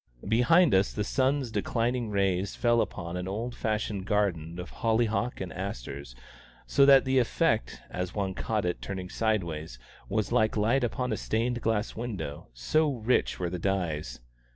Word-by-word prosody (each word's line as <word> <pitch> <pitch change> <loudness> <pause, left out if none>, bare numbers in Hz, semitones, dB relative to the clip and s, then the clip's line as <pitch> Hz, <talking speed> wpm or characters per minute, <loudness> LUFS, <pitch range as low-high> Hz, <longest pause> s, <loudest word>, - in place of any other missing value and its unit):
Behind 135 - +5
us 95 +1 +3
the 105 - -1
sun's 130 +2 +1
declining 120 0 -1
rays 100 -1 0
fell 120 -1 +3
upon 85 +1 -4
an 90 0 -3
old 115 +5 -3
fashioned 105 -4 -2
garden 90 -6 0
of 90 - -7
holly 115 0 +3
hocks 115 +3 -2
and 95 - -5
asters, 70 -8 -6 0.5
so 140 0 +4
that 135 -1 +7
the 130 0 +3
effect, 105 - +1
as 90 0 -4
one 95 -2 -1
caught 105 0 -1
it 90 - -2
turning 95 -2 -5
sideways, 85 - -1 0.3
was 105 +1 -1
like 110 0 +2
light 115 +6 +2
upon 125 +1 -1
a - - -2
stained 120 +2 -1
glass 110 -1 0
window, 95 -11 -5
so 145 - +1
rich 125 -1 0
were 90 -2 -2
the 90 - -3
dyes. 80 -9 -2
105 Hz, 165 wpm, -28 LUFS, 90-120 Hz, 0.5 s, that